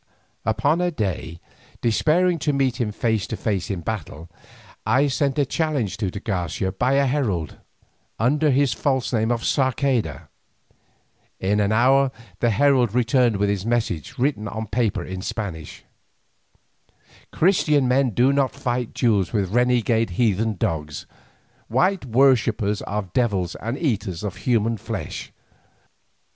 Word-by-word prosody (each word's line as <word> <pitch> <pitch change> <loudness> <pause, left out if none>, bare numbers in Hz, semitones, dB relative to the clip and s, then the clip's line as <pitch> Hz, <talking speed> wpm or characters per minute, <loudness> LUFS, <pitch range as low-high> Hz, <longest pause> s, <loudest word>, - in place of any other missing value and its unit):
Upon 145 - +1
a 180 - +2
day, 95 - -3 0.4
despairing 165 +9 +2
of 145 - +2
meeting 130 -3 0
him - - -4
face 110 -2 -1
to 110 - -4
face 100 -5 -2
in 95 -4 -3
battle, 85 -5 -6 0.5
I 130 +6 +3
sent 135 +2 0
a 145 - +3
challenge 145 - -1
to 105 -4 -1
de 100 - -6
Garcia 95 -2 -2
by 125 +7 0
a 140 0 +3
herald, 120 - -1 0.6
under 145 +7 +2
his 135 -2 +2
false 130 +1 -1
name 110 -1 +1
of 120 -1 -1
Sarceda. 130 - 0 1.1
In 100 +2 +1
an 105 0 +1
hour 135 +4 +4 0.3
the 120 - +2
herald 125 -1 +3
returned 120 -2 +3
with 100 +1 +1
this 100 -2 -1
message 115 - -2
written 125 -5 0
on 110 +2 -4
paper 110 0 -1
in 95 0 -6
Spanish: 95 -7 -6 1.5
"Christian 150 -6 +3
men 130 +1 +3
do 125 +5 +3
not 140 -1 +1
fight 125 -3 -3
duels 105 -7 +2
with 100 -3 -1
renegade 120 -2 +2
heathen 110 -1 +1
dogs, 75 -4 -3 0.6
white 180 - +1
worshippers 115 -5 +2
of 100 -3 -4
devils 100 -8 0
and 115 +4 -4
eaters 105 - -2
of 100 -2 -4
human 115 +1 +1
flesh. - - -6
115 Hz, 140 wpm, -23 LUFS, 100-135 Hz, 1.5 s, hour